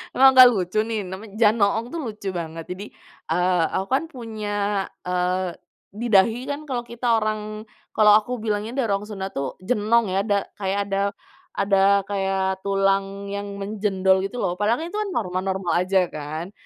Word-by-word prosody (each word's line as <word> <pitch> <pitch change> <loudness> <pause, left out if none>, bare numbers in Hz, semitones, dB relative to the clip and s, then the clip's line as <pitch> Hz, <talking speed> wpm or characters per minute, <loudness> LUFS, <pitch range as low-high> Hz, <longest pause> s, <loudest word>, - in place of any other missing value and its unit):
emang 265 +1 +8
nggak 255 -1 +10
lucu 190 0 -1
nih, 220 -3 -2
namanya 195 +3 -8
Janoong 215 0 +3
tuh 335 - -3
lucu 210 -3 -6
banget 165 -1 -5
jadi, 190 +3 -6 0.5
eee, 180 0 +2
aku 190 - 0
kan 275 - +2
punya, 205 -4 -2 0.2
eee, 180 0 0 0.4
di 235 +3 -3
dahi 225 +5 +4
kan 290 +2 -5
kalau 245 -3 -2
kita 240 +1 -5 0.2
orang 215 0 -3 0.3
kalau 210 -1 +6
aku 245 +4 -5
bilangnya 215 +2 -2
dari 245 -6 0
orang 200 +1 -1
Sunda 195 -2 -5
tuh, 135 -1 -4
jenong 215 0 +2
ya, 190 - +1
da 200 -2 +2 0.2
kayak 195 0 -1
ada 195 - +1 0.6
ada 200 0 +3
kayak 190 -1 -1
tulang 195 0 0
yang 200 0 -5
menjendol 195 -2 +1
gitu 195 +4 -3
loh 180 +1 -2
padahal 210 +3 +2
kan 330 - -4
itu 420 - -3
kan 425 - -1
normal-normal 190 -2 -1
aja 185 +1 +2
kan. 155 +5 -6
200 Hz, 170 wpm, -23 LUFS, 190-220 Hz, 0.6 s, nggak